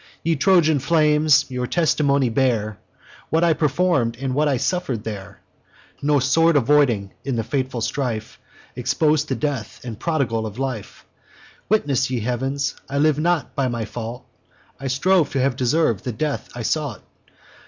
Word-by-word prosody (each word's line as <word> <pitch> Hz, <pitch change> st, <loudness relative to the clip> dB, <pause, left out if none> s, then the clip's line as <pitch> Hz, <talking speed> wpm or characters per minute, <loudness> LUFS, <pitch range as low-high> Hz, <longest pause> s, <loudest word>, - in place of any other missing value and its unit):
Ye 165 Hz, 0 st, +1 dB
Trojan 160 Hz, -1 st, +4 dB
flames, 150 Hz, 0 st, +3 dB
your 125 Hz, -1 st, -2 dB
testimony 140 Hz, -5 st, +2 dB
bear, 110 Hz, -5 st, 0 dB, 0.5 s
What 160 Hz, +1 st, +2 dB
I 170 Hz, -1 st, +4 dB
perform'd, 145 Hz, -6 st, +1 dB
and 130 Hz, 0 st, -3 dB
what 150 Hz, +3 st, +2 dB
I 140 Hz, -3 st, +1 dB
suffer'd 135 Hz, -, -2 dB
there; 100 Hz, -3 st, -7 dB, 0.6 s
No 145 Hz, 0 st, +3 dB
sword 155 Hz, +4 st, +3 dB
avoiding 125 Hz, -7 st, +2 dB
in 135 Hz, -2 st, -2 dB
the 115 Hz, -, -1 dB
fatal 130 Hz, 0 st, -2 dB
strife, 115 Hz, -4 st, -3 dB, 0.4 s
Expos'd 145 Hz, +5 st, +1 dB
to 135 Hz, -, -1 dB
death, 125 Hz, -3 st, -3 dB
and 115 Hz, -4 st, -7 dB
prodigal 125 Hz, -9 st, -1 dB
of 105 Hz, +1 st, -9 dB
life; 130 Hz, -6 st, -5 dB, 0.6 s
Witness, 140 Hz, -, +1 dB
ye 125 Hz, -3 st, -2 dB
heavens! 130 Hz, +4 st, -1 dB, 0.2 s
I 140 Hz, -, -2 dB
live 150 Hz, 0 st, +3 dB
not 170 Hz, -1 st, 0 dB
by 135 Hz, -2 st, 0 dB
my 120 Hz, -2 st, -3 dB
fault: 115 Hz, +2 st, -7 dB, 0.5 s
I 135 Hz, -, -4 dB
strove 160 Hz, +6 st, +2 dB
to 135 Hz, -, 0 dB
have 130 Hz, -1 st, +1 dB
deserv'd 125 Hz, -2 st, +1 dB
the 125 Hz, -, -3 dB
death 150 Hz, +5 st, -3 dB
I 120 Hz, -, -5 dB
sought. 145 Hz, -2 st, -2 dB
135 Hz, 155 wpm, -22 LUFS, 120-150 Hz, 0.6 s, Trojan